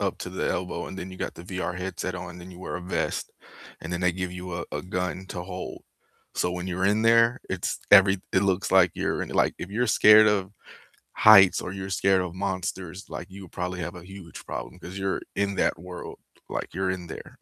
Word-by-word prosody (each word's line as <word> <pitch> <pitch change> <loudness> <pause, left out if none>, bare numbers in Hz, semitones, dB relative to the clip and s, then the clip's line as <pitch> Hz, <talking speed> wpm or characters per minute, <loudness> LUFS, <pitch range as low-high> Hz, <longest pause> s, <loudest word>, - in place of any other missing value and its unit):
up - - -1
to - - -6
the - - -2
elbow, 90 +1 -2
and 95 - -7
then 95 - -6
you 95 - -9
got - - -4
the 85 - -10
VR 90 -1 -4
headset 90 0 -4
on, 90 -1 -7
then 90 +1 -10
you 90 - -12
wear 90 - -5
a - - -6
vest, 90 +2 -2 0.5
and 80 - -6
then 90 - -2
they 90 -1 +3
give 90 0 -4
you 90 -1 -6
a 85 - -3
a - - -3
gun 90 +1 -3
to 90 - -5
hold. 90 0 -7 0.5
So 90 - 0
when 90 0 -4
you're 95 +1 0
in 105 +2 +2
there, 115 +2 +5
it's 95 -2 -2
every 95 -1 +7
It 95 - +3
looks 95 -1 0
like 90 -3 +6
you're - - -1
in - - -5
like, - - +2
if - - -6
you're 120 +5 0
scared 110 -1 +7
of 100 -3 +1 0.6
heights 100 -3 +8
or 90 - -5
you're 95 0 -6
scared 95 +1 +3
of 90 -1 -5
monsters, 95 -1 -4
like, 85 - -7
you 100 +1 -10
would 90 - -13
probably 90 +1 -3
have 85 +2 -4
a 85 - -10
huge 95 -2 -11
problem, 90 - -6
'cause 90 +2 -8
you're 95 -1 -1
in 100 0 0
that - - +1
world, 90 +1 -8 0.3
like, - - -4
you're 95 +1 0
in 90 -2 -4
there, - - -9
95 Hz, 230 wpm, -26 LUFS, 90-95 Hz, 0.6 s, heights